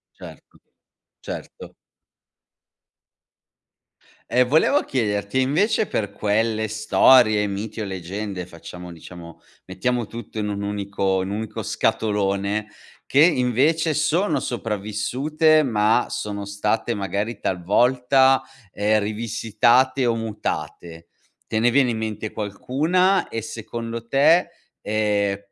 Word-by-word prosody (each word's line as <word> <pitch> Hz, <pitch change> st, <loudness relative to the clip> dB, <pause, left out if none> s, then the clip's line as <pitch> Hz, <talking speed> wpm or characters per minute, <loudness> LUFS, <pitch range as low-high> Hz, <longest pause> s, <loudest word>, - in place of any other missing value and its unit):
Certo, -, -, -14 dB, 0.6 s
certo. -, -, -9 dB, 2.6 s
E 125 Hz, +2 st, +4 dB
volevo 160 Hz, -, +3 dB
chiederti 105 Hz, -1 st, -1 dB
invece 200 Hz, -, +1 dB
per 105 Hz, -2 st, -2 dB
quelle 110 Hz, +2 st, 0 dB
storie, 110 Hz, 0 st, +4 dB
miti 105 Hz, +2 st, -5 dB
o -, -, -3 dB
leggende, 95 Hz, 0 st, -5 dB
facciamo 90 Hz, +1 st, -10 dB
diciamo, 85 Hz, 0 st, -12 dB, 0.2 s
mettiamo 120 Hz, +2 st, -2 dB
tutto 115 Hz, -1 st, -9 dB
in 105 Hz, -1 st, -2 dB
un 100 Hz, 0 st, -3 dB
unico 100 Hz, -2 st, -1 dB
in 95 Hz, -, -4 dB
un 100 Hz, -, -3 dB
unico 110 Hz, 0 st, -5 dB
scatolone, 105 Hz, 0 st, -1 dB, 0.4 s
che 140 Hz, -, +2 dB
invece 155 Hz, +2 st, +2 dB
sono 160 Hz, +6 st, +1 dB
sopravvissute 125 Hz, +9 st, 0 dB
ma 110 Hz, -2 st, +2 dB
sono 100 Hz, -1 st, -5 dB
state 105 Hz, +3 st, -1 dB
magari 100 Hz, +3 st, -3 dB
talvolta, 125 Hz, +8 st, +2 dB, 0.3 s
ehm, 105 Hz, +1 st, +2 dB
rivisitate 115 Hz, +4 st, +1 dB
o 115 Hz, -, +2 dB
mutate. 85 Hz, -6 st, -5 dB, 0.4 s
Te 110 Hz, -, -1 dB
ne 120 Hz, +2 st, +3 dB
viene 130 Hz, -1 st, +3 dB
in 115 Hz, -, -2 dB
mente 110 Hz, -1 st, -4 dB
qualcuna 155 Hz, -, 0 dB
e 115 Hz, -, -4 dB
secondo 115 Hz, +1 st, -6 dB
te, 155 Hz, +7 st, +4 dB, 0.3 s
ehm, 105 Hz, -2 st, 0 dB
110 Hz, 110 wpm, -22 LUFS, 100-125 Hz, 2.6 s, E